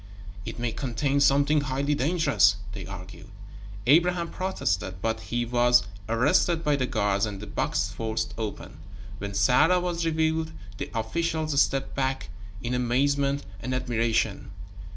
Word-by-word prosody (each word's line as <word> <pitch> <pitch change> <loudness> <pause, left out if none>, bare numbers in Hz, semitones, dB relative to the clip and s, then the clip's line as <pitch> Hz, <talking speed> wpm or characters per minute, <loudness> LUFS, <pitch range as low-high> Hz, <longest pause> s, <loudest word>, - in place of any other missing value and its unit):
"It - - -6
may 120 -1 -1
contain 135 +4 -1
something 145 +2 +4
highly 140 +1 -1
dangerous," 150 - +3 0.2
they 100 -4 -7
argued. 95 +1 -9 0.6
Abraham 170 +4 +3
protested, 95 - -2
but 110 +2 -1
he 120 +1 -2
was 120 0 +4 0.3
arrested 145 +8 +2
by 150 -2 +2
the 130 -2 -1
guards 105 -4 +1
and 100 -2 -6
the 105 - -7
box - - -1
forced 110 0 -3
open. 110 -3 -6 0.4
When 100 0 -5
Sarah 125 - +4
was 175 -1 -2
revealed, 160 0 0 0.3
the - - -4
officials 155 +5 0
stepped 135 0 0
back 135 0 -2 0.3
in 120 +1 -2
amazement 140 +3 +1 0.2
and 130 0 -2
admiration. 115 -4 0
130 Hz, 135 wpm, -26 LUFS, 110-150 Hz, 0.6 s, something